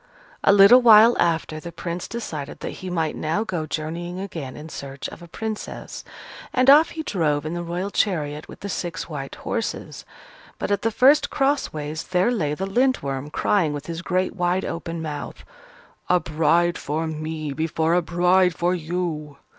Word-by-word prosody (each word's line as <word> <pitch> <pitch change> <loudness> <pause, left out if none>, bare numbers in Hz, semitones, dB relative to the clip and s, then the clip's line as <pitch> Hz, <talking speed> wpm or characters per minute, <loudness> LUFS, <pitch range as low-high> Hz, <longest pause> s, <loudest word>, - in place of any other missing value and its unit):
A - - +6
little 200 +5 +8
while 230 0 +8
after, 165 -2 0
the 170 +2 -8
Prince 170 +1 -5
decided 155 -12 -6
that - - -4
he 185 - -5
might 165 -3 -1
now 160 +8 -1
go 175 -7 -3
journeying 170 +4 -4
again 165 -9 -6
in 155 - -8
search 140 -3 -7
of - - -12
a 170 - -11
Princess. 220 +4 -6 0.5
And 255 +1 +6
off 310 +3 +7
he 315 - -2
drove 150 - 0
in 155 - -3
the 175 - -3
Royal 175 +4 -3
chariot 150 -8 -1
with - - -12
the 200 - -5
six 175 -3 -4
white 140 -4 -6
horses. 230 -2 -4 0.5
But - - -3
at 200 - +1
the 225 - +1
first 270 +6 +4
cross 280 0 +1
ways, 155 +1 -4
there 185 +6 +1
lay 150 -11 -1
the 190 - -3
Lindworm, 195 - 0
crying 160 0 +1
with 145 -1 -6
his 170 0 -5
great 185 +1 -1
wide 180 0 0
open 165 -1 -4
mouth, 150 -2 -6 0.7
"A 180 - +5
bride 165 +2 +1
for 155 +3 -2
me 155 -1 -4
before 160 +2 0
a 180 - +4
bride 180 +1 +3
for 175 +1 +1
you!" 160 -4 -3
170 Hz, 180 wpm, -23 LUFS, 155-195 Hz, 0.7 s, little